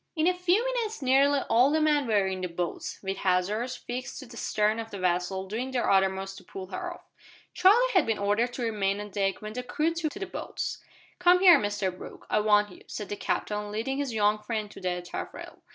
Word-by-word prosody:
In 315 -1 +1
a 365 - +4
few 360 +6 +2
minutes 460 - -2
nearly 275 +2 +4
all 245 +3 +4
the 310 +2 +2
men 300 -3 +2
were 205 -3 +3
in 190 -1 -3
the 180 - -1
boats, 170 0 -4
with 195 0 -3
hawsers 200 +7 0
fixed 245 +1 -6
to 270 - -8
the 235 -1 -13
stern 215 -1 0
of 225 0 -5
the 200 - -7
vessel, 185 +1 0
doing 230 +6 -3
their 255 -2 -1
uttermost 195 0 +1
to - - -18
pull 190 -1 -8
her - - -4
off. - - -18 0.5
Charlie 435 +8 +5
had 365 - +4
been 225 -2 +1
ordered 205 +4 +1
to 245 - -4
remain 205 -3 0
on 210 0 -7
deck 195 +1 -1
when 215 0 -6
the 250 - -3
crew 300 +6 -1
took 330 -2 -2
to 400 - -8
the 390 - -3
boats. - - -5 0.4
"Come 355 0 +5
here, 360 -5 +8
Mr 205 -3 -1
Brooke, - - -11
I - - +3
want 210 -1 +3
you," - - -14
said 210 - -6
the 205 - -2
Captain, 210 0 -2
leading 235 +6 -2
his 280 -3 -2
young 210 -1 +2
friend 210 -1 -4
to - - -12
the 180 -1 -2
taffrail. 175 - -7
215 Hz, 230 wpm, -28 LUFS, 195-285 Hz, 0.5 s, here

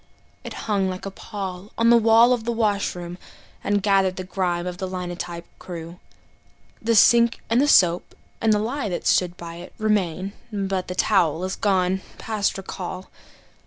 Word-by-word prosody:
It - - -7
hung 200 -3 +1
like 185 +1 -6
a 195 - -4
pall 195 -1 -7
on 230 +1 +4
the - - +8
wall 230 +2 +6
of 240 -3 -2
the 235 - -1
washroom, 200 -6 -1 0.4
And 205 -1 0
gathered 195 -2 +3
the 185 - -5
grime 180 -2 -2
of 180 0 -5
the 190 - -2
linotype 175 -2 -5
crew. 170 0 -8 0.8
The 230 +1 +1
sink 235 +2 +5
and 235 +3 +4
the 290 - +3
soap 175 -9 +4 0.3
and 225 - +3
the 210 - +4
lye 225 +2 -2
that 175 - -4
stood 175 -1 +2
by 170 0 -8
it 175 - -11
Remain; 195 -3 0 0.2
but 195 -3 -2
the 180 - -5
towel 175 -5 +2
is 190 +1 -2
gone 190 -2 +1 0.2
past 215 -3 -1
recall. 185 -1 -7
190 Hz, 170 wpm, -23 LUFS, 180-215 Hz, 0.8 s, the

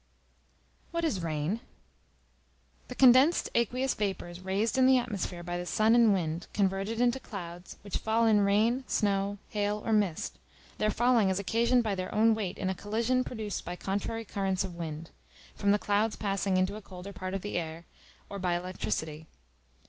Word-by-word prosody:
What 335 0 -1
is 235 - 0
Rain? 160 +5 -1 1.3
The 250 - -7
condensed 260 +6 +5
aqueous 250 +3 +1
vapors 180 -4 -3
raised 195 +4 -1
in 260 -1 +5
the 260 0 +6
atmosphere 200 -7 -3
by 175 0 -3
the 175 - -4
sun 215 +6 +3
and 235 -2 +6
wind, 170 -3 -1
converted 195 +3 0
into 245 +1 +2
clouds, 175 -7 -8
which 200 - -3
fall 225 +1 +2
in 215 -2 +5
rain, 215 +6 +2
snow, 200 -1 0
hail, 210 0 -1
or 225 - +1
mist: 200 -7 0 0.4
their 215 - +2
falling 235 -2 +3
is 190 - 0
occasioned 235 +5 +2
by 215 -3 -1
their 185 -1 -4
own 225 +1 +5
weight 205 -4 -3
in 190 - -2
a 190 - +1
collision 230 +6 0
produced 220 -5 -5
by 175 - -5
contrary 205 +5 -3
currents 195 -2 -1
of 185 -2 -6
wind, 165 -1 -6 0.4
from 200 - -1
the 205 - +5
clouds 210 +2 +1
passing 195 -2 0
into 185 +2 +1
a - - -9
colder 190 +1 -9
part 185 0 -5
of 195 - -4
the 205 -3 -1
air, 165 0 -6 0.4
or 200 - -6
by 180 -2 0
electricity. 160 - -4
200 Hz, 175 wpm, -30 LUFS, 185-225 Hz, 1.3 s, the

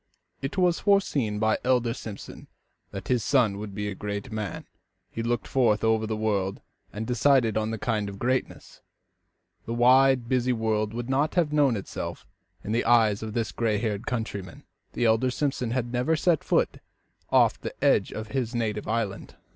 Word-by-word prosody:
It 135 +8 -4
was 180 -2 +3
foreseen 145 - +1
by 110 +1 +2
the - - -9
elder 125 -2 +2
Simpson 110 -4 -9 0.4
that 100 -2 -8
his 125 -4 +1
son 115 -8 +2
would 105 -2 -7
be 105 0 -3
a 100 - -3
great 100 +5 -5
man. 110 -2 -4 0.5
He 115 - -4
looked 120 +1 -1
forth 115 -6 +2
over 110 0 +2
the 110 0 -2
world 100 -3 -1 0.3
and 110 +2 -5
decided 125 -1 +3
on 110 0 0
the 115 - -3
kind 105 -2 -1
of 100 - -8
greatness. 130 +4 -3 0.9
The 115 - -2
wide, 130 0 +5
busy 125 0 +1
world 110 -1 -1
would 120 0 -4
not 140 +5 0
have 165 -4 +1
known 140 -6 +3
itself 100 - -6
as - - -24
seen 105 - -10
in 120 - +2
the - - -4
mind 110 -4 +4
of 110 -1 -5
this 115 -1 -1
gray 110 -3 0
haired 105 +1 -3
countryman. 105 -7 -4 0.3
The 120 - 0
elder 115 +3 +3
Simpson 130 -2 -1
had 120 0 -2
never 125 +6 +1
set 160 0 +1
foot - - +1 0.5
off - - +3
the - - -6
edge - - +3
of 110 0 -6
his 125 -2 -2
native 110 -3 -2
island. 110 -3 -3
115 Hz, 185 wpm, -26 LUFS, 105-130 Hz, 0.9 s, wide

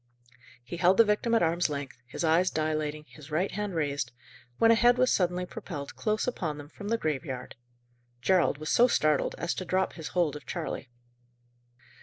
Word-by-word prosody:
He 150 +8 -7
held 185 +2 +4
the 230 - +7
victim 215 +3 +1
at 225 - +3
arm's 170 +1 +2
length, 140 -4 -5
his 130 - -5
eyes 165 +3 +4
dilating, 155 -1 -2
his 150 -1 -14
right 170 +6 0
hand 205 -2 -3
raised, 145 -5 -1 0.5
when 230 0 +5
a - - +8
head 240 +2 +5
was 255 0 +3
suddenly 180 -1 +1
propelled 170 -8 -7
close 215 -1 0
upon 165 -11 -2
them 145 0 -10
from 200 +5 -9
the 230 +2 +1
graveyard. 140 - -3 0.7
Gerald 175 +2 +2
was 155 +1 -4
so 245 - +6
startled 155 - +2
as 170 - -1
to - - -4
drop 185 +1 0
his 160 -3 -7
hold 170 -5 0
of 150 - -10
Charley. 165 -7 -4
170 Hz, 185 wpm, -29 LUFS, 150-200 Hz, 0.7 s, a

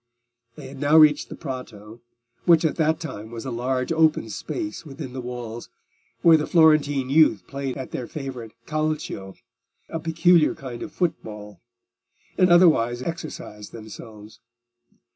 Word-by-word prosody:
They - - -10
had 135 0 -11
now 145 +2 +4
reached 155 -2 +5
the - - -7
Prato, 115 -5 -8 0.4
which 170 -2 +5
at 160 - +1
that 160 -1 +1
time 110 -9 -7
was 115 +1 -8
a 130 - -4
large 125 +3 -2
open 160 -8 +2
space 315 - -5
within 140 -4 -8
the 130 - -5
walls, 120 -2 -7 0.5
where 165 -2 +7
the 150 - -3
Florentine 145 -5 +3
youth 140 - +4
played 135 +2 -5
at 130 - -7
their 125 - -5
favourite 130 -6 -7
Calcio—a 115 -4 -5
peculiar 165 0 +3
kind 125 -3 -8
of - - -6
football—and 175 - -4
otherwise 140 -9 +4
exercised 155 -10 -7
themselves. 110 -1 -11
135 Hz, 135 wpm, -24 LUFS, 115-160 Hz, 0.5 s, where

